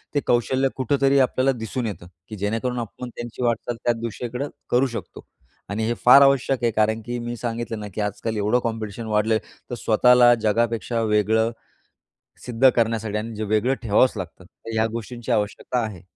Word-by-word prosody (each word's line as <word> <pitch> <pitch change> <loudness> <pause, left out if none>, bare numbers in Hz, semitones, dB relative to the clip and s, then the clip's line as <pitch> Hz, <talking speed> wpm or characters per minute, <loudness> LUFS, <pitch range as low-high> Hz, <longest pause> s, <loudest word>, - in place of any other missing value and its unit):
ते - - +4
कौशल्य 130 +3 +2
कुठेतरी 135 +1 +2
आपल्याला 130 0 +2
दिसून 115 +2 -3
येतं 95 -4 -7 0.2
की 110 - -6
जेणेकरून 115 +5 -2
आपण 120 +2 -6
त्यांची 120 +1 -6
वाटचाल 120 0 -1
त्या 120 - +2
दिशेकडं 125 +4 -4 0.2
करू 130 +2 +3
शकतो - - -8 0.4
आणि 110 +2 -2
हे 120 - +1
फार 125 +3 +9
आवश्यक 135 -2 +3
आहे. 120 - +3
कारण 110 +1 +1
की 120 0 -4
मी 120 0 -4
सांगितलं 115 -1 -4
ना 105 - -6
की - - -2
आजकाल 105 +2 -3
एवढं 105 +4 +2
कॉम्पिटिशन 110 -1 -4
वाढलं 105 +1 +1
आहे, 110 - -1 0.3
तर 120 - -3
स्वतःला 120 +2 +5
जगापेक्षा 115 +1 0
वेगळं 110 +1 +2 0.9
सिद्ध 125 +2 +4
करण्यासाठी 115 -2 0
आणि 110 +1 -5
जे 110 - -4
वेगळं 110 +5 +1
ठेवावच 115 +4 +3
लागतं 90 -1 -7
तर 115 - -12
ह्या 110 0 +2
गोष्टींची 115 +1 -6
आवश्यकता 105 +4 -1
आहे. 100 -6 -8
115 Hz, 175 wpm, -23 LUFS, 110-125 Hz, 0.9 s, फार